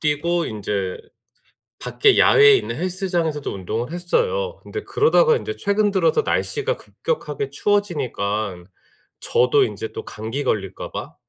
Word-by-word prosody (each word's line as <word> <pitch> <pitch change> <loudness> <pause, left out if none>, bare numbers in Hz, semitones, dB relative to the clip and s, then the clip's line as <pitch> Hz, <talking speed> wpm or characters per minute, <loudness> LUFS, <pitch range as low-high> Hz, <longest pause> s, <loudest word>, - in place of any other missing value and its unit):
뛰고 165 +3 0
인제 100 -3 -3 0.8
밖에 415 -2 +3
야외에 425 -1 +7
있는 - - -3
헬스장에서도 175 -4 -2
운동을 110 - -4
했어요. 480 - -1
근데 425 - -6
그러다가 470 +1 +3
인제 430 -1 -5
최근 205 0 +1
들어서 190 - +2
날씨가 460 +2 -1
급격하게 445 -3 -4
추워지니깐 110 - -1 0.5
저도 130 +2 +3
인제 110 -1 -4
또 - - -6
감기 115 +7 -5
걸릴까 95 -3 -3
봐 - - -6
170 Hz, 315 characters per minute, -21 LUFS, -, 0.8 s, 야외에